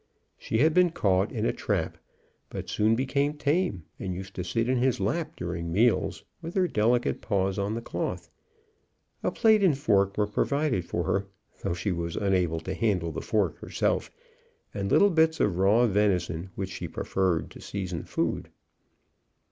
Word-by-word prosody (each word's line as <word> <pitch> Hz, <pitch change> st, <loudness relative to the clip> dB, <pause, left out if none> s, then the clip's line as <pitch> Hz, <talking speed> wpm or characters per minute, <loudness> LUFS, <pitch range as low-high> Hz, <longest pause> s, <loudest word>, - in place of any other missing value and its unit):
She 110 Hz, -, -2 dB
had 155 Hz, +6 st, +4 dB
been 180 Hz, 0 st, +5 dB
caught 95 Hz, -, +1 dB
in -, -, -2 dB
a -, -, +1 dB
trap, -, -, -1 dB, 0.5 s
but -, -, -6 dB
soon 110 Hz, +2 st, +2 dB
became 140 Hz, +4 st, 0 dB
tame, 145 Hz, -, 0 dB, 0.2 s
and 95 Hz, -2 st, -3 dB
used 95 Hz, +1 st, -7 dB
to 90 Hz, -, -4 dB
sit 115 Hz, +6 st, -1 dB
in 130 Hz, 0 st, +2 dB
his 125 Hz, -1 st, +1 dB
lap 120 Hz, -, -1 dB
during 85 Hz, -1 st, -4 dB
meals, 115 Hz, +7 st, +2 dB, 0.2 s
with 165 Hz, +1 st, -7 dB
her 185 Hz, -2 st, +3 dB
delicate 120 Hz, -1 st, +1 dB
paws 95 Hz, -2 st, 0 dB
on 100 Hz, +2 st, -1 dB
the 115 Hz, -, -4 dB
cloth. -, -, -3 dB, 0.9 s
A -, -, +1 dB
plate 220 Hz, -2 st, +4 dB
and 165 Hz, -8 st, +4 dB
fork 100 Hz, -7 st, +2 dB
were 105 Hz, -, +3 dB
provided 130 Hz, -, 0 dB
for 85 Hz, -, -2 dB
her, 95 Hz, +4 st, 0 dB, 0.3 s
though 85 Hz, -, -1 dB
she 95 Hz, +3 st, -2 dB
was 85 Hz, -1 st, -3 dB
unable 90 Hz, -5 st, +1 dB
to -, -, -4 dB
handle 95 Hz, -8 st, 0 dB
the -, -, -5 dB
fork -, -, 0 dB
herself; -, -, -1 dB, 0.6 s
and 100 Hz, -1 st, -3 dB
little 200 Hz, 0 st, +5 dB
bits 160 Hz, -1 st, +3 dB
of 90 Hz, -3 st, +1 dB
raw 105 Hz, +6 st, +5 dB
venison, 95 Hz, -5 st, +1 dB
which 95 Hz, -1 st, -4 dB
she -, -, -5 dB
preferred 95 Hz, -4 st, -1 dB
to -, -, -12 dB
seasoned 90 Hz, -5 st, -5 dB
food. -, -, -1 dB
105 Hz, 170 wpm, -27 LUFS, 95-130 Hz, 0.9 s, been